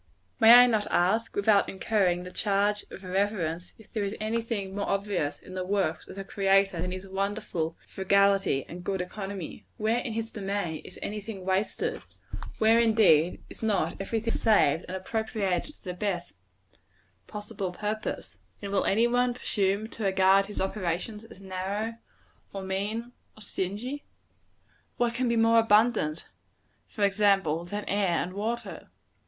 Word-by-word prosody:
May 225 Hz, 0 st, +9 dB
I 245 Hz, +1 st, +10 dB
not 220 Hz, -4 st, +1 dB
ask, 220 Hz, +6 st, +1 dB
without 205 Hz, 0 st, +3 dB
incurring 190 Hz, -3 st, +1 dB
the 180 Hz, -, -8 dB
charge 205 Hz, +1 st, +1 dB
of 195 Hz, -, -10 dB
irreverence, 180 Hz, -3 st, -1 dB
if 220 Hz, -, -19 dB
there 215 Hz, -, -1 dB
is 200 Hz, +2 st, -3 dB
any 220 Hz, +2 st, -1 dB
thing 205 Hz, -4 st, -4 dB
more 200 Hz, -, -2 dB
obvious, 195 Hz, -7 st, -1 dB
in 185 Hz, -, -12 dB
the 185 Hz, 0 st, -3 dB
works 185 Hz, -4 st, -1 dB
of -, -, -10 dB
the 195 Hz, -, -5 dB
Creator, 195 Hz, -2 st, +2 dB
than 180 Hz, +1 st, -2 dB
his 185 Hz, +1 st, -6 dB
wonderful 195 Hz, -4 st, -2 dB
frugality 195 Hz, -6 st, +2 dB
and 175 Hz, +1 st, -8 dB
good 195 Hz, +1 st, -2 dB
economy? 195 Hz, -1 st, -6 dB
Where, 220 Hz, +2 st, +1 dB
in 240 Hz, -2 st, -4 dB
his 225 Hz, 0 st, -3 dB
domain, 195 Hz, -6 st, -3 dB
is -, -, -9 dB
any 210 Hz, +1 st, -4 dB
thing 195 Hz, -3 st, -8 dB
wasted? 190 Hz, +2 st, -1 dB, 0.6 s
Where, 225 Hz, +1 st, +5 dB
indeed, 210 Hz, -8 st, +4 dB
is -, -, -12 dB
not 205 Hz, -7 st, +1 dB
every 225 Hz, +3 st, -1 dB
thing 230 Hz, +1 st, -2 dB
saved 180 Hz, -8 st, +3 dB
and 185 Hz, -, -4 dB
appropriated 210 Hz, -, -2 dB
to -, -, -25 dB
the 180 Hz, -3 st, -4 dB
best 175 Hz, -, -3 dB, 0.9 s
possible 205 Hz, -2 st, -5 dB
purpose? 210 Hz, +3 st, -4 dB, 0.2 s
And 200 Hz, -1 st, -6 dB
will 200 Hz, -, +1 dB
any 225 Hz, +4 st, +3 dB
one 245 Hz, 0 st, +2 dB
presume 200 Hz, -3 st, 0 dB
to 225 Hz, -, -7 dB
regard 195 Hz, 0 st, +4 dB
his 205 Hz, -, -5 dB
operations 190 Hz, +3 st, -2 dB
as 195 Hz, -, -14 dB
narrow, 195 Hz, +4 st, -3 dB, 0.6 s
or 195 Hz, -1 st, -5 dB
mean, 205 Hz, +5 st, -3 dB, 0.3 s
or -, -, -14 dB
stingy? 210 Hz, +9 st, -4 dB, 0.9 s
What 240 Hz, -1 st, +1 dB
can 250 Hz, +1 st, 0 dB
be 235 Hz, -, +1 dB
more 230 Hz, 0 st, +5 dB
abundant, 215 Hz, -7 st, +3 dB, 0.6 s
for 210 Hz, -, -3 dB
example, 195 Hz, -5 st, +2 dB
than 205 Hz, +4 st, -5 dB
air 195 Hz, -4 st, +1 dB
and 180 Hz, -, -7 dB
water? 225 Hz, +4 st, -4 dB
200 Hz, 160 wpm, -28 LUFS, 185-220 Hz, 0.9 s, I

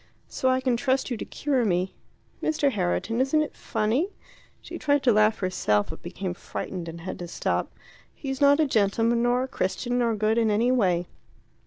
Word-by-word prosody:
So 260 Hz, -, 0 dB
I 255 Hz, 0 st, +2 dB
can 255 Hz, -2 st, +1 dB
trust 260 Hz, +2 st, 0 dB
you 240 Hz, -, -1 dB
to -, -, -5 dB
cure 275 Hz, -4 st, 0 dB
me. 185 Hz, -2 st, 0 dB, 0.5 s
Mr. 300 Hz, -3 st, +1 dB
Herriton, 215 Hz, +4 st, 0 dB
isn't 270 Hz, +4 st, +2 dB
it 300 Hz, -, -7 dB
funny?" 240 Hz, -, 0 dB, 0.5 s
She -, -, -8 dB
tried 285 Hz, -1 st, +2 dB
to 245 Hz, -, +5 dB
laugh 215 Hz, +1 st, +4 dB
herself, 110 Hz, -, 0 dB
but 160 Hz, -, -10 dB
became 180 Hz, +1 st, -4 dB
frightened 175 Hz, -1 st, -6 dB
and 165 Hz, 0 st, -8 dB
had 185 Hz, -, -6 dB
to 175 Hz, -, -5 dB
stop. -, -, -2 dB, 0.4 s
"He's 270 Hz, 0 st, -5 dB
not 285 Hz, +1 st, +6 dB
a 315 Hz, -, +4 dB
gentleman, 230 Hz, 0 st, +2 dB
nor 245 Hz, +1 st, +2 dB
a -, -, -3 dB
Christian, 245 Hz, +1 st, -1 dB
nor 230 Hz, -2 st, +1 dB
good 215 Hz, +2 st, +1 dB
in 225 Hz, -1 st, +2 dB
any 225 Hz, +4 st, +2 dB
way. 180 Hz, -8 st, +2 dB
230 Hz, 190 wpm, -26 LUFS, 190-260 Hz, 0.5 s, not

